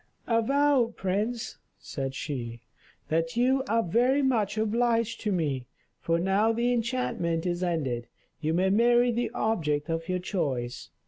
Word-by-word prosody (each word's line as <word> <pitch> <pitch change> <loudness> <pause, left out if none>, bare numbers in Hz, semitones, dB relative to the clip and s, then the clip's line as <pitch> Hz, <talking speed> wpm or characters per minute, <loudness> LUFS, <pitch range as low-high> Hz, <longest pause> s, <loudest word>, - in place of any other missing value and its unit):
"Avow, 250 +1 +2
prince," 210 +5 -2 0.2
said 135 -1 -5
she, 120 -6 -5 0.5
"that 165 +4 0
you 260 +2 +3
are 230 +1 +2
very 250 +10 +2
much 225 -6 +1
obliged 230 +1 +1
to 210 - -1
me, 145 -9 -1 0.3
for 165 0 0
now 195 +5 +2
the 240 +2 +1
enchantment 230 -9 -1
is 175 0 -1
ended. 140 -10 -1 0.3
You 160 +1 0
may 190 +2 +2
marry 240 +3 +4
the 240 +1 -1
object 160 -10 0
of 165 +1 -3
your 185 - +1
choice. 130 - -3
200 Hz, 140 wpm, -28 LUFS, 165-235 Hz, 0.5 s, marry